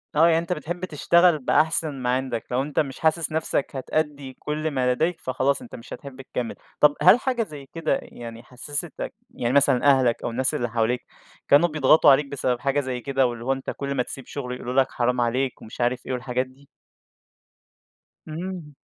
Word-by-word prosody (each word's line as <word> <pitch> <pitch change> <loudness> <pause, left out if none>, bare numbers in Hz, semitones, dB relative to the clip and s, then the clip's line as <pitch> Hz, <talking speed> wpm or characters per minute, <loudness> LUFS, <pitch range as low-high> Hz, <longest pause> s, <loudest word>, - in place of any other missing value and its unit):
آه. 160 +2 +6
يعني 165 -1 +4
أنت 170 +2 -1
بتحب 175 +4 -4
تشتغل 170 0 +3
بأحسن 155 +2 +1
ما 125 - -1
عندك، 130 -3 -2
لو 125 +2 +1
أنت 145 +1 -2
مش 135 -3 -2
حاسس 160 0 +1
نفسك 155 -3 -1
هتأدّي 140 0 -2
كل 155 +1 -2
ما 125 -2 +1
لديك، 165 +6 0
فخلاص 130 +2 0
أنت 245 - -10
مش 115 +1 -10
هتحِب 135 -1 -9
تكمّل. 125 -2 -4 0.2
طب 150 -1 +6
هل 185 +9 +7
حاجة 250 -3 0
زي 145 -7 -10
كده 165 -1 -1
يعني 115 -1 -10
حسّستك 140 +4 -5 0.2
يعني 120 +2 -2
مثلًا 140 -3 +4
أهلك 130 -3 +2
أو - - -1
الناس 130 +3 -1
اللي 120 -1 -1
حواليك، 120 +2 0 0.4
كانوا 165 +5 +5
بيضغطوا 150 0 +5
عليك 140 +2 +4
بسبب 130 -3 -1
حاجة 140 +1 +1
زي 130 -3 -3
كده 135 0 +1
واللي 120 0 -6
هو 135 - +2
أنت 135 - -6
كل 140 0 -3
ما 125 - +1
تسيب 135 0 -9
شُغل 125 -3 -5
يقولوا 125 0 -5
لك 135 0 +3
حرام 125 0 0
عليك 125 +2 -1
ومش 110 - -8
عارف 120 +1 0
إيه 130 - -3
والحاجات 125 +1 -1
دي؟ 135 +2 -21 1.6
إمم. 165 -2 -6
135 Hz, 190 wpm, -24 LUFS, 125-155 Hz, 1.6 s, هل